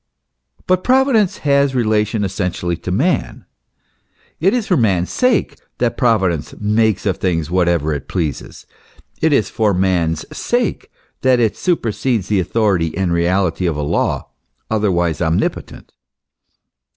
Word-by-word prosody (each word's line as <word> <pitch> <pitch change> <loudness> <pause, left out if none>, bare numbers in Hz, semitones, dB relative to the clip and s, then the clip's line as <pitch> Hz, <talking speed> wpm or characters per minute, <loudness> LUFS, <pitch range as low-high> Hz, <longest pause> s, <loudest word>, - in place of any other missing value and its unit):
But 185 0 +1
Providence 255 -6 +3
has 140 -1 +3
relation 110 -2 +1
essentially 90 -3 -2
to 90 - -6
man. 145 - -1 0.9
It 185 +5 +3
is 245 -3 0
for 185 - +2
man's 95 - +1
sake 250 -5 +1 0.2
that 120 -1 0
Providence 95 - 0
makes 105 -1 +1
of 95 -2 0
things 85 -3 -1
whatever 85 -4 +1
it 70 -1 -5
pleases: 80 -8 -4 0.6
it 160 - +3
is 125 -8 +1
for 105 -3 +1
man's 90 -4 0
sake - - -1 0.3
that 130 -1 +3
it 115 -3 +1
supersedes 120 - -1
the 105 -2 +2
authority 95 -4 0
and 95 -3 0
reality 90 +1 +1
of 80 - -1
a 75 - -2
law 75 - -1 0.4
otherwise 90 -7 0
omnipotent. 80 0 -2
100 Hz, 130 wpm, -18 LUFS, 85-125 Hz, 0.9 s, Providence